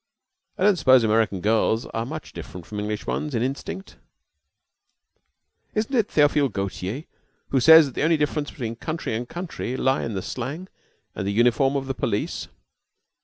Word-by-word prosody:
"I - - -1
don't 205 -2 +5
suppose 130 -5 +5
American 110 -3 +2
girls 110 +2 +2
are 115 +1 -4
much 155 +2 -7
different 90 -3 -9
from 105 - -6
English 105 0 -3
ones 150 -4 -2
in 115 - +1
instinct." 140 +8 -5 1.8
"Isn't 220 +5 -1
it 225 -4 +2
Theophile 145 -2 +3
Gautier 100 +5 -4 0.5
who 135 - +2
says 160 +4 +9
that 135 - -7
the - - -3
only 160 +1 +3
difference 150 0 -1
between 115 -4 -5
country 155 -1 -4
and 120 +2 -3
country 170 -8 -5
lie 130 +1 +1
in 115 - -4
the 95 - -3
slang 145 +10 -5 0.4
and 95 - -4
the - - 0
uniform 120 +5 +3
of 135 -1 -1
the 135 - -2
police?" - - -2
130 Hz, 170 wpm, -24 LUFS, 110-155 Hz, 1.8 s, says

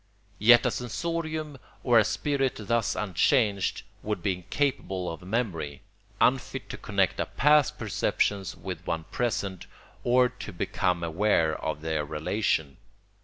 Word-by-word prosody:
Yet 120 +3 +7
a - - +2
sensorium 155 +3 -3 0.2
or 120 -2 +6
a - - +5
spirit 135 +4 0
thus 115 +2 0
unchanged 105 - +1 0.2
would 105 -5 -3
be 100 - +2
incapable 95 -1 -2
of 80 - -8
memory, 90 - -3 0.4
unfit - - +1
to - - -6
connect - - 0
a - - 0
past 150 -1 +3
perception 105 -2 0 0.2
with - - -6
one 80 0 -1
present 100 -6 -2 0.4
or 125 +1 +4
to 125 -3 -9
become 90 -1 -1
aware 85 -2 +2
of 75 - -4
their 80 -1 -1
relation. 80 -1 -1
105 Hz, 130 wpm, -27 LUFS, 90-125 Hz, 0.4 s, Yet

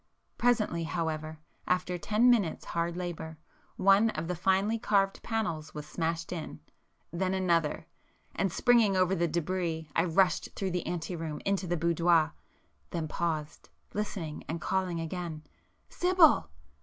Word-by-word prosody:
Presently 215 -9 +2
however, 160 -2 -3 0.3
after 180 0 0
ten 215 +6 +2
minutes' 205 -9 +1
hard 170 0 -2
labour, 160 -3 -5 0.4
one 195 +3 +5
of 165 - -4
the 180 - -2
finely 195 +6 +1
carved 195 -2 +1
panels 170 -10 -3
was 150 -1 -5
smashed 165 +1 -3
in,—then 170 - -6
another,—and, 175 +1 -2
springing 230 -3 +4
over 185 0 +3
the 170 -2 +1
débris 170 0 -2
I 165 - +3
rushed 180 +2 +2
through 190 -2 -2
the 180 -1 -2
ante 175 0 -3
room 160 -2 -4
into 195 -2 0
the 175 +1 0
boudoir,—then 165 0 -1
paused, 155 -3 -3 0.2
listening, 185 -7 -4
and 165 +2 -2
calling 185 -1 -1
again, 165 -1 -5 0.4
"Sibyl!" 360 -3 +4
175 Hz, 130 wpm, -30 LUFS, 165-195 Hz, 0.4 s, one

